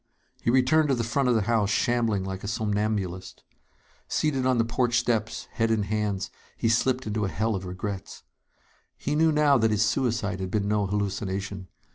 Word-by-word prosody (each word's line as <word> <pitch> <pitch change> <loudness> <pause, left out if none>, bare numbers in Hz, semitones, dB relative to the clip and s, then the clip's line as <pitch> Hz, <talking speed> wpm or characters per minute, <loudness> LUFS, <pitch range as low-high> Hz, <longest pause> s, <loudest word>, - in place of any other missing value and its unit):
He - - 0
returned 130 +5 +4
to 135 - +3
the 120 - -1
front 125 +3 +1
of 120 - +3
the 110 - +2
house, 110 -2 +1
shambling 115 -2 +1
like 95 0 -5
a - - -4
somnambulist. 105 -4 -2 0.6
Seated 135 -4 0
on 130 -1 +3
the 115 - +2
porch 120 +1 +1
steps, 110 -2 -1
head 115 0 0
in 110 -2 +2
hands, 100 -1 -2 0.3
he 115 - +1
slipped 130 +3 +1
into 105 0 -1
a 100 - 0
hell 110 +3 -1
of 95 -2 -4
regrets. 95 +2 -6 0.7
He 145 - -2
knew 160 +1 +4
now 150 -3 +4
that 110 0 +3
his 105 0 +2
suicide 115 -5 0
had 95 -1 -3
been 100 0 -1
no 105 -1 +1
hallucination. 100 -1 -3
110 Hz, 185 wpm, -26 LUFS, 100-120 Hz, 0.7 s, returned